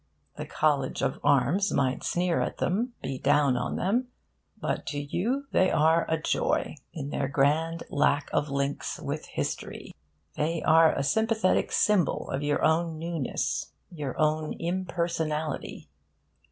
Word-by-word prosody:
The - - -6
College 145 -4 0
of 135 +2 -1
Arms 145 +9 +3
might 130 -2 0
sneer 175 -1 +1
at - - -2
them, 235 +7 0
be 130 - -3
down 145 -2 +3
on 125 - -2
them, 235 +7 0 0.5
but - - -3
to 145 - -2
you 225 - -1
they 185 - +4
are 160 +2 +3
a 160 - +1
joy, - - 0 0.2
in 145 -4 -6
their 135 - -1
grand 155 +4 +1
lack 145 0 +2
of 145 - +1
links 140 0 -2
with - - -4
history. - - -5 0.4
They 160 +2 -1
are 160 0 +6
a - - 0
sympathetic 220 +4 +1
symbol 200 -8 +2
of 135 - -2
your 145 0 0
own 160 +1 +2
newness, 165 -4 -2 0.2
your 145 -7 -5
own 155 0 +1
impersonality. 170 -4 -2
155 Hz, 140 wpm, -27 LUFS, 145-175 Hz, 0.5 s, are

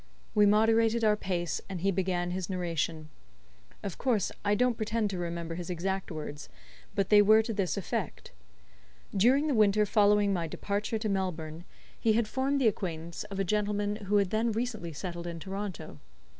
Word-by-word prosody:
We 210 -1 +5
moderated 225 +2 +3
our 210 -1 +5
pace, 175 -4 -2
and 185 -3 -5
he 195 +2 +2
began 180 -1 -1
his 185 0 -3
narration. 165 -3 -2 0.7
Of 195 -4 -5
course 230 -7 +1
I 205 - +2
don't 250 +2 +3
pretend 215 -1 -1
to 185 - -4
remember 170 -1 -4
his 175 +1 -6
exact 190 +2 -2
words, 150 -2 -7 0.5
but 195 -1 0
they 210 -1 +8
were 215 +2 +6
to 225 0 -3
this 185 -8 -1
effect. - - -4 0.8
During 255 +9 +4
the 300 - +1
winter 210 -2 +4
following 205 -1 +4
my 170 -3 -1
departure 205 +7 -2
to 215 0 -3
Melbourne, 175 -4 -3 0.3
he 225 - +3
had 225 0 +1
formed 270 +4 0
the 255 - +4
acquaintance 170 -4 -3
of 200 -2 -7
a - - +2
gentleman 205 +1 0
who 205 - +1
had 200 -2 +1
then 225 +2 +1
recently 220 -6 -3
settled 175 +2 -6
in 170 -1 -5
Toronto. 190 - -6
200 Hz, 175 wpm, -30 LUFS, 175-215 Hz, 0.8 s, they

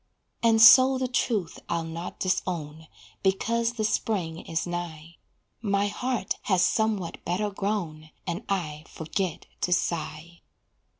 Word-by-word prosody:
And 225 -1 +4
so 260 +4 +9
the 255 0 -1
truth 225 -8 -1
I'll 165 - 0
not 165 +2 -6
disown, 160 -4 -2 0.3
Because 230 +5 +1
the 225 -3 -2
spring 185 -6 -1
is 165 -2 -3
nigh; 170 -2 -6 0.4
My 200 -2 +1
heart 245 -1 -2
has 185 -2 +4
somewhat 215 -6 0
better 205 +4 -1
grown, 185 -7 -3 0.2
And 175 - -3
I 160 -6 -2
forget 170 +2 -3 0.2
to 180 - 0
sigh. 170 -1 -2
185 Hz, 125 wpm, -27 LUFS, 165-215 Hz, 0.4 s, so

